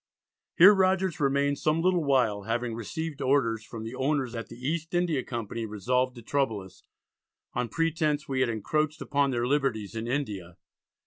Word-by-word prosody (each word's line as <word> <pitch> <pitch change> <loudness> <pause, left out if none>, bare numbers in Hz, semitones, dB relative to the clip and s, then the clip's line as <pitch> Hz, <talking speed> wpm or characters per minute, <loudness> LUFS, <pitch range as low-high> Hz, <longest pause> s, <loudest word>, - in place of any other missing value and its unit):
Here 190 +5 +10
Rogers 190 -2 +2
remained 140 0 +1
some 155 +2 +1
little 180 -2 +3
while, 125 -8 +2
having 120 +1 -1
received 150 +7 -5
orders 115 -5 +2
from 110 0 -8
the 115 +2 -6
owners 135 -1 0
that 115 -3 -6
the - - -9
East 160 +6 -3
India 170 -6 +1
Company 115 -1 -4
resolved 125 +5 0
to 120 - -11
trouble 115 -5 0
us, 95 -1 -14 0.7
"on 125 -1 -2
pretence 155 -2 0
we 135 -2 -1
had 130 -2 +2
encroached 150 +8 -1
upon 140 -1 +1
their 120 -2 0
liberties 125 -7 0
in 115 +1 -3
India." 105 -10 -3
135 Hz, 170 wpm, -28 LUFS, 115-155 Hz, 0.7 s, Here